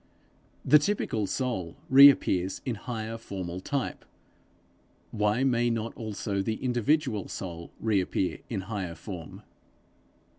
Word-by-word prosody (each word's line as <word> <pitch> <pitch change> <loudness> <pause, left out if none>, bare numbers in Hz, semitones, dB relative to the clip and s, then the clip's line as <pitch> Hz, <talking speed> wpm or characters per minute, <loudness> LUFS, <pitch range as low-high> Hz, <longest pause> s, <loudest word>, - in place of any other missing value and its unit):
The 150 - +7
typical 145 - -1
soul 95 -8 -3
reappears 130 -9 +6
in 125 - -1
higher 115 0 -5
formal 95 -5 -5
type; 140 +7 -3 1.1
why 105 +3 +1
may 120 -2 +2
not 115 -1 -2
also 105 -2 -3
the 110 +3 -1
individual 125 - 0
soul 85 -3 -7
reappear 95 -5 0
in 105 -5 -2
higher 95 -4 -4
form? 85 -1 -9
110 Hz, 110 wpm, -28 LUFS, 95-125 Hz, 1.1 s, The